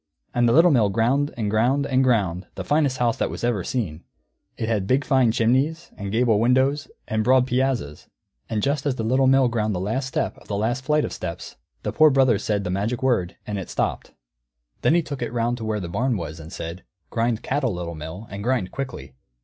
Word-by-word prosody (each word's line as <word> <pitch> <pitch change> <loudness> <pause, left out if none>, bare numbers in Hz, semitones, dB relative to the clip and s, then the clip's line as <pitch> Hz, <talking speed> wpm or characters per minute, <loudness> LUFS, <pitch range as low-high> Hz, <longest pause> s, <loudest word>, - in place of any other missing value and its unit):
And 120 -1 +3
the - - +3
Little 170 +2 +6
Mill 115 -7 +4
ground, 125 +8 +1
and 110 -3 -1
ground, 125 +6 +2
and 130 -1 +2
ground 100 -8 +1
the - - -4
finest 145 -3 +1
house 120 -2 +1
that - - -1
ever 120 -2 +1
was - - -5
seen. 90 -11 -3 0.5
It 110 - -2
had 105 -4 0 0.2
fine 130 -3 +4
big 110 - +2
chimneys, 135 +8 +1
and 100 -1 -5
gable 115 -1 +3
windows, 130 +5 +2 0.2
and 110 0 0
broad 130 +2 +4
piazzas; 125 - -1 0.4
and 110 -2 -1
just 140 +1 0
as 135 - 0
the 115 - -3
Little 130 +4 +3
Mill 135 -1 +5
ground 110 -3 -1
the - - -2
last 115 +8 -2
step 135 - -2
of - - -18
the 100 - -2
last 120 +6 -1
flight 150 +2 +2
of - - -5
steps, 85 -2 -6 0.3
the - - -2
Poor 155 0 +6
Brother 130 -6 +3
said 105 -2 -1
the 90 - -3
magic 110 +6 -2
word, 100 -9 +1
and 105 -2 -3
it 95 - -7
stopped. - - -2 0.7
Then 160 - +3
he 175 - +3
took 140 -3 -6
it 120 - -2
round 120 0 0
to 115 - -6
where 110 -1 -1
the 90 - -5
barn 120 +7 0
was, 80 -2 -6
and 80 +1 -10
said, 85 +3 -6 0.3
"Grind 115 -1 0
cattle, 130 -7 0
Little 85 -1 -5
Mill, 80 +7 -8
and 100 +1 -6
grind 120 -6 0
quickly." 120 - -6
115 Hz, 220 wpm, -23 LUFS, 100-130 Hz, 0.7 s, Little